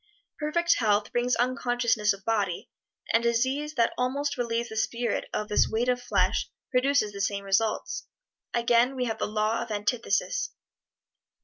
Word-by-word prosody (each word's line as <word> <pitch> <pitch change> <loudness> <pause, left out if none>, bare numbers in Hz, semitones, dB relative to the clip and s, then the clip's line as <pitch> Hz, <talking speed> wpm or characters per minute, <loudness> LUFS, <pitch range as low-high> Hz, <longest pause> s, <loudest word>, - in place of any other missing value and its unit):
Perfect 340 +3 +2
health 210 -2 +2
brings 245 +1 +1
unconsciousness 245 -4 +1
of 195 -1 -6
body, 205 -6 -1 0.4
and 230 - +5
disease 260 +6 0
that 235 -3 +2
almost 280 +3 0
relieves 235 -1 -1
the 220 - -7
spirit 235 +1 -1
of 210 - -2
this 210 - +3
weight 235 +3 0
of 245 0 +1
flesh 245 - +1 0.2
produces 255 -4 +2
the 200 -1 -6
same 200 0 -1
results. 200 +3 0 0.4
Again 240 +2 +3
we 250 -1 -1
have 225 -2 -3
the - - 0
Law 215 +1 0
of - - -5
Antithesis. 235 - -1
235 Hz, 150 wpm, -27 LUFS, 215-250 Hz, 0.4 s, and